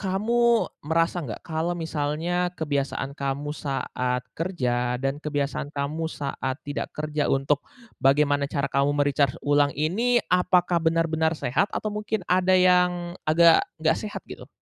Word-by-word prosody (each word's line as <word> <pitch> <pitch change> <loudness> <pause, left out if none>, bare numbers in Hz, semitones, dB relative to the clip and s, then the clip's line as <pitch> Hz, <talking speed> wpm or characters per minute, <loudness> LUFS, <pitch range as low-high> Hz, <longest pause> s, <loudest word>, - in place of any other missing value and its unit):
kamu 230 +5 +2 0.2
merasa 165 +3 0
nggak, 125 -9 -7
kalau 165 +2 -2
misalnya 165 +3 -1
kebiasaan 140 -2 -2
kamu 140 +1 -3
saat 125 -3 -3
kerja 125 -8 -1
dan 135 +3 -2
kebiasaan 145 -2 -2
kamu 150 +3 -3
saat 135 -3 -4
tidak 145 -1 -4
kerja 150 -1 -1
untuk 135 +1 +1 0.4
bagaimana 140 +1 +3
cara 140 -2 -2
kamu 140 +1 +2
me-recharge 145 -2 +2
ulang 145 -1 +2
ini, 215 +12 +1 0.2
apakah 180 -1 +3
benar-benar 160 0 +1
sehat, 155 - 0
atau 215 -1 -3
mungkin 210 -2 -3
ada 185 +1 +3
yang 180 -1 +3 0.2
agak 165 +1 +6 0.2
nggak 160 0 +1
sehat 210 -1 -6
gitu? - - -11
155 Hz, 135 wpm, -25 LUFS, 140-175 Hz, 0.4 s, agak